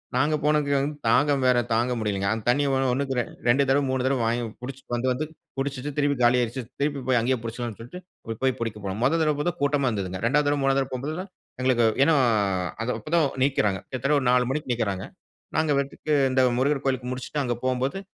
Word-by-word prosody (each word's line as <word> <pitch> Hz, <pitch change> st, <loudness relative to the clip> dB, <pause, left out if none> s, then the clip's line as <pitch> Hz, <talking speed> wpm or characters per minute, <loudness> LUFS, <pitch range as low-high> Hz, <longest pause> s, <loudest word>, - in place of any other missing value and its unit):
நாங்க 150 Hz, +2 st, +2 dB
போனது 150 Hz, -1 st, +2 dB
வந்து 140 Hz, +2 st, 0 dB
தாகம் 140 Hz, +2 st, +3 dB
வேற 125 Hz, -1 st, +4 dB
தாங்க 120 Hz, +3 st, +2 dB
முடியலிங்க, 100 Hz, -2 st, -1 dB
அந்த 110 Hz, -1 st, -5 dB
தண்ணீ 140 Hz, +4 st, +3 dB
ஒன்னுக்கு 135 Hz, +1 st, 0 dB, 0.3 s
இரண்டு 130 Hz, +3 st, +3 dB
தடவை 140 Hz, +1 st, +3 dB
மூனு 130 Hz, -1 st, 0 dB
தடவை 130 Hz, -2 st, +1 dB
வாங்கி 120 Hz, +1 st, 0 dB, 0.2 s
பிடிச்சு 130 Hz, +1 st, -7 dB
வந்து 120 Hz, +2 st, 0 dB
வந்து 140 Hz, +5 st, -1 dB, 0.3 s
பிடிச்சிட்டு 135 Hz, 0 st, -3 dB
திருப்பி 145 Hz, -1 st, +2 dB
காலி 120 Hz, +1 st, +5 dB
ஆயிடுச்சு, 120 Hz, +2 st, -2 dB, 0.2 s
திருப்பி 145 Hz, -1 st, 0 dB
போய் 125 Hz, -2 st, +3 dB
அங்கேயே 125 Hz, +2 st, +1 dB
பிடிச்சு 115 Hz, +1 st, -6 dB
கொள்ளலாம்னு 115 Hz, -3 st, -5 dB
சொல்லிட்டு, 120 Hz, +10 st, -9 dB, 0.2 s
அங்க 115 Hz, 0 st, -5 dB
போய் 130 Hz, -1 st, +2 dB
பிடிக்க 110 Hz, -2 st, -3 dB
போனோம், 95 Hz, +3 st, -3 dB
முதல் 160 Hz, +5 st, +3 dB
தடவை 150 Hz, +2 st, +1 dB
கூட்டமா 140 Hz, -2 st, +2 dB
இருந்ததுங்க, 95 Hz, -4 st, -3 dB
2வது 145 Hz, +5 st, +2 dB
தடவை, 145 Hz, 0 st, +1 dB
3வது 135 Hz, 0 st, +3 dB
தடவை 135 Hz, -, -2 dB
போகும்போது, 155 Hz, +8 st, -4 dB, 0.4 s
எங்களுக்கு 125 Hz, -3 st, +3 dB, 0.2 s
ஏனா 160 Hz, -, +4 dB, 0.8 s
அப்போ -, -, -20 dB
தான் 165 Hz, -3 st, +4 dB, 0.2 s
நீக்கிறாங்க, 105 Hz, -9 st, +1 dB
கிட்டத்தட்ட 140 Hz, +3 st, 0 dB
ஒரு 130 Hz, -, -2 dB
4 125 Hz, -1 st, +3 dB
மணிக்கு 140 Hz, -2 st, -2 dB
நீக்கிறாங்க, 100 Hz, -5 st, -2 dB, 0.5 s
நாங்க 155 Hz, -1 st, +2 dB
பாட்டுக்கு 145 Hz, +2 st, -2 dB, 0.2 s
இந்த 130 Hz, -, +1 dB, 0.2 s
முருகர் 140 Hz, +1 st, +1 dB
கோவிலுக்கு 130 Hz, -2 st, -1 dB
முடிச்சிட்டு, 130 Hz, +3 st, -3 dB
அங்கு 120 Hz, -2 st, -2 dB
போகும்போது 130 Hz, +7 st, 0 dB
130 Hz, 195 wpm, -25 LUFS, 120-145 Hz, 0.8 s, காலி